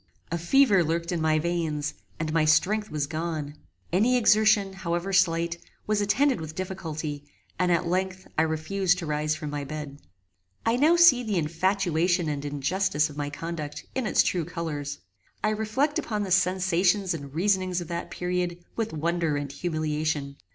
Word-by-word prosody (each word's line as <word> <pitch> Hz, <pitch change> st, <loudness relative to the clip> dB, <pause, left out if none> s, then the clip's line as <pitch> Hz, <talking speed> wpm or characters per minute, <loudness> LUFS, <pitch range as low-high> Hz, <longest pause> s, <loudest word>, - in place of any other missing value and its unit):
A 170 Hz, -, 0 dB
fever 200 Hz, +1 st, +4 dB
lurked 170 Hz, +2 st, -1 dB
in 170 Hz, -2 st, -1 dB
my 155 Hz, 0 st, +3 dB
veins, 160 Hz, -3 st, -1 dB, 0.3 s
and 155 Hz, 0 st, -2 dB
my 165 Hz, -1 st, +3 dB
strength 195 Hz, +8 st, +2 dB
was 150 Hz, -2 st, -1 dB
gone. 155 Hz, -1 st, -4 dB, 0.4 s
Any 235 Hz, +7 st, +4 dB
exertion, 215 Hz, -3 st, +4 dB
however 180 Hz, 0 st, -3 dB
slight, 170 Hz, -2 st, +2 dB, 0.3 s
was 210 Hz, -1 st, +1 dB
attended 250 Hz, -, +2 dB
with 155 Hz, 0 st, -7 dB
difficulty, 160 Hz, -6 st, -4 dB, 0.4 s
and, 180 Hz, -1 st, +2 dB
at 175 Hz, +1 st, +2 dB
length, 185 Hz, +2 st, -1 dB
I -, -, +3 dB
refused 175 Hz, +4 st, +1 dB
to 175 Hz, -, -4 dB
rise 150 Hz, 0 st, 0 dB
from 150 Hz, -1 st, -5 dB
my 145 Hz, -1 st, -3 dB
bed. 145 Hz, 0 st, -7 dB, 0.7 s
I 225 Hz, +1 st, +3 dB
now 305 Hz, +7 st, +4 dB
see 340 Hz, -8 st, +7 dB
the 215 Hz, -5 st, -1 dB
infatuation 175 Hz, +1 st, +1 dB
and 145 Hz, -1 st, -3 dB
injustice 150 Hz, +2 st, 0 dB
of 145 Hz, -, -12 dB
my 145 Hz, -1 st, -2 dB
conduct 150 Hz, -1 st, -6 dB
in 260 Hz, -4 st, -1 dB
its -, -, +4 dB
true 175 Hz, -2 st, 0 dB
colours. 150 Hz, -4 st, -4 dB, 0.5 s
I 215 Hz, -, +3 dB
reflect 220 Hz, +8 st, 0 dB
upon 210 Hz, -2 st, -2 dB
the 190 Hz, -, -5 dB
sensations 185 Hz, +1 st, +2 dB
and 140 Hz, -3 st, -7 dB
reasonings 185 Hz, 0 st, +1 dB
of 175 Hz, -, -6 dB
that 170 Hz, 0 st, -4 dB
period 180 Hz, -1 st, -2 dB, 0.2 s
with 225 Hz, -4 st, -2 dB
wonder 165 Hz, -1 st, 0 dB
and 145 Hz, -1 st, -4 dB
humiliation. 155 Hz, -3 st, -2 dB
170 Hz, 165 wpm, -26 LUFS, 155-190 Hz, 0.7 s, see